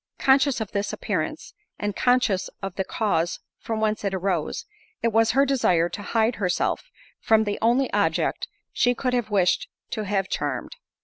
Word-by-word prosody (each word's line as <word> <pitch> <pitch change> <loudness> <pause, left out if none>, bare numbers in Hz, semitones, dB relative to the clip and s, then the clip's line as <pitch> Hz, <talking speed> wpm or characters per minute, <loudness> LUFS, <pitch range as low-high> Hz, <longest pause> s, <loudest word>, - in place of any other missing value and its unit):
Conscious 270 0 +3
of 220 -3 -4
this 200 0 -1
appearance, - - -3 0.2
and 205 -1 -3
conscious 245 -6 +2
of 195 -2 -3
the 190 - -1
cause 175 -6 0 0.2
from 225 -1 -3
whence 215 -1 0
it 195 -1 -1
arose, 185 -4 -1 0.4
it 230 - +4
was 225 0 +3
her 275 +2 +4
desire 180 -11 +2
to 205 - -6
hide 225 +2 +1
herself 195 - -1 0.3
from 220 0 +4
the 205 -1 -2
only 245 +4 +2
object - - +1 0.3
she 245 0 +2
could 250 +1 -1
have 240 -3 0
wished 190 -4 +2 0.2
to 215 - -2
have 195 -1 0
charmed. - - -3
215 Hz, 170 wpm, -25 LUFS, 195-245 Hz, 0.4 s, it